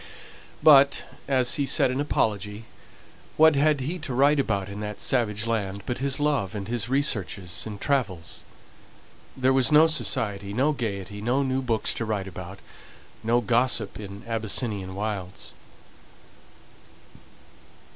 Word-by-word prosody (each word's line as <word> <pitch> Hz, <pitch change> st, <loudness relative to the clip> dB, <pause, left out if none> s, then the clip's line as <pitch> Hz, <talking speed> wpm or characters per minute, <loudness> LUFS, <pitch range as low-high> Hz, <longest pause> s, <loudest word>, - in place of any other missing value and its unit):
But, 140 Hz, -2 st, +6 dB, 0.2 s
as 130 Hz, -3 st, +3 dB
he 140 Hz, -2 st, 0 dB
said 130 Hz, -, +4 dB
in 130 Hz, +2 st, -1 dB
apology, 105 Hz, -5 st, -1 dB, 0.7 s
what 160 Hz, -1 st, +6 dB
had 145 Hz, 0 st, +2 dB
he 165 Hz, +8 st, -3 dB
to 130 Hz, -5 st, -5 dB
write 140 Hz, +3 st, +4 dB
about 100 Hz, -7 st, -1 dB
in 100 Hz, +1 st, -7 dB
that 105 Hz, -1 st, -5 dB
savage 110 Hz, -4 st, 0 dB
land, 100 Hz, -4 st, -2 dB
but 125 Hz, -, -3 dB
his 135 Hz, +1 st, 0 dB
love, 140 Hz, -10 st, 0 dB
and 100 Hz, -2 st, -5 dB
his 120 Hz, 0 st, -2 dB
researches, 105 Hz, -, -1 dB
and 105 Hz, -2 st, -7 dB
travels? 105 Hz, -, -2 dB, 0.9 s
There 130 Hz, 0 st, +3 dB
was 130 Hz, +2 st, +3 dB
no 150 Hz, +1 st, +7 dB
society, 105 Hz, -10 st, -2 dB
no 135 Hz, +7 st, +2 dB
gaiety, 105 Hz, -6 st, -4 dB
no 125 Hz, +5 st, +1 dB
new 130 Hz, 0 st, -1 dB
books 115 Hz, -4 st, 0 dB
to 115 Hz, -, -3 dB
write 105 Hz, -3 st, -2 dB
about, 95 Hz, 0 st, -8 dB, 0.7 s
no 120 Hz, +2 st, +2 dB
gossip 115 Hz, -2 st, +1 dB
in 100 Hz, 0 st, -9 dB
Abyssinian 110 Hz, -4 st, -1 dB
wilds. 100 Hz, -3 st, -5 dB
115 Hz, 135 wpm, -25 LUFS, 100-135 Hz, 0.9 s, no